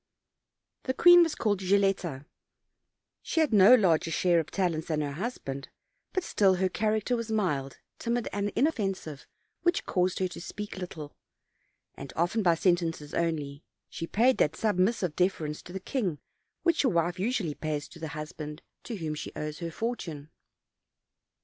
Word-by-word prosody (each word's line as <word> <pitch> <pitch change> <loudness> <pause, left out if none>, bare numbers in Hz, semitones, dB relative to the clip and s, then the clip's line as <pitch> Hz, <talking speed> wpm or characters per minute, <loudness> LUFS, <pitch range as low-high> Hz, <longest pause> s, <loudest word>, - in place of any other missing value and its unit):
The 260 - -1
queen 350 0 +8
was 330 -2 +2
called 205 -3 0
Gilletta; 190 -7 +1 1.0
she 330 - -1
had 310 -7 +2
no 205 +4 +8
larger 170 -8 +3
share 170 +1 +3
of 160 - -3
talents 170 -5 -1
than 155 -2 0
her 145 -1 -2
husband, 140 - -5 0.4
but 375 - -1
still 195 - +3
her 185 +1 +1
character 215 +4 0
was 230 -1 -4
mild, 150 -11 -1 0.2
timid 235 0 -1
and 205 0 -1
inoffensive, 195 - -1 0.3
which 345 +1 +1
caused 180 -1 +1
her 185 - +1
to 175 - -8
speak 205 +3 -6
little, 155 -5 -7 0.8
and 140 -1 -9
often 175 +7 +1
by 175 -4 +4
sentences 165 -4 0
only; 155 -4 -2 0.3
she 165 - -5
paid 245 +7 +3
that 150 - +2
sub 210 -5 0
missive 185 -5 +1
deference 160 -5 0
to 175 - -12
the 190 - -4
king 190 - -2 0.5
which 335 -3 +3
a 260 - +4
wife 175 -1 0
usually 200 - 0
pays 150 -1 -3
to 170 - -13
the 160 - -4
husband 150 0 -7 0.2
to 235 - -4
whom 160 -5 -3
she 150 - -6
owes 150 0 -5
her 170 -2 -4
fortune. 165 -8 -5
180 Hz, 160 wpm, -29 LUFS, 155-215 Hz, 1.0 s, queen